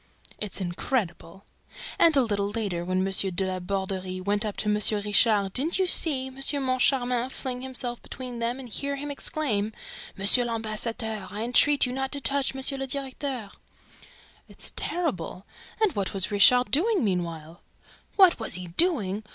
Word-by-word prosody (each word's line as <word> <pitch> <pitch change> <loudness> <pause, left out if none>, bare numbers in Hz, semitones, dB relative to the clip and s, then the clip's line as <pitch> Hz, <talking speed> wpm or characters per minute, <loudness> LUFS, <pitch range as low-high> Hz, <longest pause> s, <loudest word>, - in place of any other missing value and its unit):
"It's 210 -2 -2
incredible!" 180 -1 -3 0.5
"And, 325 -3 +5
a 270 - +5
little 205 -3 -1
later, 205 -6 -3
when 185 +1 0
M. 195 - 0 0.2
de 190 - +2
La 185 0 -2
Borderie 190 0 -3
went 205 +3 0
up 210 -2 -4
to - - -1
M. 210 - +3 0.2
Richard, 205 -1 +3
didn't 305 +7 -1
you 380 - +2
see 295 -6 +2
M. 265 0 -9 0.3
Moncharmin 255 -1 +1
fling 255 -2 -5
himself 255 -2 -3
between 250 -2 -7
them 235 +2 -2
and 260 - -8
hear 280 +5 -3
him 290 +1 -5
exclaim, 220 -8 -1 0.4
'M. 215 +6 +4
l'Ambassadeur 220 -2 -3
I 210 +2 -4
entreat 275 +4 +4
you 250 - -3
not 265 0 -3
to 285 - -1
touch 275 -1 0
M. 265 - -5 0.2
le 270 - -3
Directeur'?" 265 -5 -4 1.0
"It's - - -7
terrible!... 200 - -2 0.3
And 435 -5 +3
what 200 0 -2
was 190 +2 +1
Richard 245 +5 +5
doing 385 - +2
meanwhile?" 170 -4 -3 0.5
"What 375 -7 +6
was 225 - -2
he 180 -1 -7
doing? 215 - +1
230 Hz, 160 wpm, -26 LUFS, 195-265 Hz, 1.0 s, What